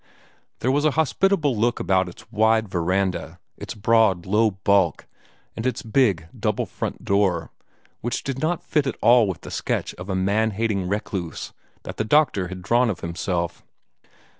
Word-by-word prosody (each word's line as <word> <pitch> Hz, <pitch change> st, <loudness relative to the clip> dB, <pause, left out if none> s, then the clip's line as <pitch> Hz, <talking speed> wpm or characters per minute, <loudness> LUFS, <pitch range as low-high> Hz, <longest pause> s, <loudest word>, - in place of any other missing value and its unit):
There 130 Hz, -, +2 dB
was 145 Hz, +2 st, +1 dB
a 155 Hz, -, +4 dB
hospitable 160 Hz, -2 st, +2 dB
look 115 Hz, +3 st, +1 dB
about 95 Hz, -1 st, +1 dB
its 90 Hz, -, -14 dB
wide 110 Hz, 0 st, +3 dB
veranda, 90 Hz, -1 st, -1 dB, 0.2 s
its -, -, -7 dB
broad, 110 Hz, -4 st, +3 dB
low 110 Hz, +3 st, +3 dB
bulk, 95 Hz, -3 st, +1 dB, 0.5 s
and 115 Hz, -, -4 dB
its 125 Hz, -2 st, -2 dB
big, 105 Hz, -8 st, +2 dB
double -, -, -1 dB
front -, -, -5 dB
door, 95 Hz, -5 st, +1 dB, 0.5 s
which 120 Hz, 0 st, -3 dB
did 135 Hz, -1 st, -3 dB
not 160 Hz, +4 st, -1 dB
fit 150 Hz, -3 st, 0 dB
at 130 Hz, -, -3 dB
all 120 Hz, 0 st, +6 dB
with 95 Hz, -4 st, -4 dB
the -, -, -9 dB
sketch -, -, -2 dB
of 90 Hz, +2 st, -8 dB
a 95 Hz, -, -1 dB
man 100 Hz, +4 st, +1 dB
hating 105 Hz, -5 st, 0 dB
recluse 95 Hz, -4 st, -4 dB, 0.3 s
that -, -, -8 dB
the -, -, 0 dB
doctor 110 Hz, -7 st, +2 dB
had 90 Hz, 0 st, -8 dB
drawn 120 Hz, +5 st, +3 dB
of 95 Hz, -, -4 dB
himself. 85 Hz, 0 st, -3 dB
105 Hz, 165 wpm, -23 LUFS, 95-120 Hz, 0.5 s, all